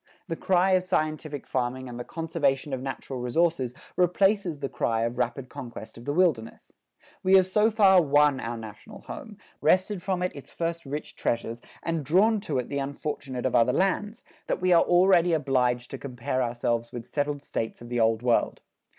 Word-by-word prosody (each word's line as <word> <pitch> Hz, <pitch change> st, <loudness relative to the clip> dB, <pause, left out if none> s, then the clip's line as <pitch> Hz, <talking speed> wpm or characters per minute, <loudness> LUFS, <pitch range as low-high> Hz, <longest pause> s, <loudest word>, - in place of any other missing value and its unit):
The 165 Hz, -, -2 dB
cry 185 Hz, +2 st, +2 dB
of 185 Hz, -1 st, +3 dB
scientific 155 Hz, -4 st, -2 dB
farming 130 Hz, 0 st, -2 dB
and 120 Hz, -1 st, -7 dB
the -, -, -4 dB
conservation 150 Hz, -4 st, -1 dB
of 130 Hz, -, -2 dB
natural 135 Hz, -1 st, -5 dB
resources 130 Hz, 0 st, 0 dB, 0.2 s
replaces 185 Hz, -1 st, +2 dB
the 140 Hz, -1 st, -3 dB
cry 115 Hz, -3 st, -1 dB
of 120 Hz, +1 st, -2 dB
rapid 125 Hz, +1 st, -1 dB
conquest 115 Hz, -3 st, -9 dB
of 120 Hz, -, -12 dB
the 145 Hz, -, -1 dB
wilderness. 150 Hz, -10 st, 0 dB, 0.5 s
We 190 Hz, +1 st, +4 dB
have 190 Hz, -1 st, +7 dB
so 210 Hz, +4 st, +3 dB
far 195 Hz, -4 st, +6 dB
won 145 Hz, -2 st, +3 dB
our 115 Hz, 0 st, -4 dB
national 110 Hz, -2 st, -10 dB
home, -, -, -9 dB, 0.2 s
wrested 185 Hz, +1 st, +2 dB
from 185 Hz, -1 st, -1 dB
it 180 Hz, -, -2 dB
its 140 Hz, -, -10 dB
first 165 Hz, -2 st, -4 dB
rich 145 Hz, +2 st, -5 dB
treasures, 115 Hz, 0 st, -2 dB, 0.2 s
and 165 Hz, -2 st, -1 dB
drawn 200 Hz, -, +3 dB
to 160 Hz, -9 st, -3 dB
it 125 Hz, -, -2 dB
the 140 Hz, -, -2 dB
unfortunate 135 Hz, -2 st, -4 dB
of 130 Hz, -, 0 dB
other 120 Hz, +2 st, +4 dB
lands, 205 Hz, +3 st, 0 dB, 0.2 s
that -, -, -1 dB
we 185 Hz, 0 st, +3 dB
are 170 Hz, -, +6 dB
already 175 Hz, -1 st, +4 dB
obliged 125 Hz, -5 st, +1 dB
to -, -, -6 dB
compare 130 Hz, -1 st, -3 dB
ourselves 120 Hz, -1 st, -1 dB
with 120 Hz, -2 st, -7 dB
settled 145 Hz, -1 st, -2 dB
states 115 Hz, -5 st, -4 dB
of 120 Hz, -, -11 dB
the 120 Hz, 0 st, -1 dB
Old 115 Hz, 0 st, +2 dB
World. 120 Hz, -2 st, +1 dB
145 Hz, 185 wpm, -27 LUFS, 125-175 Hz, 0.5 s, have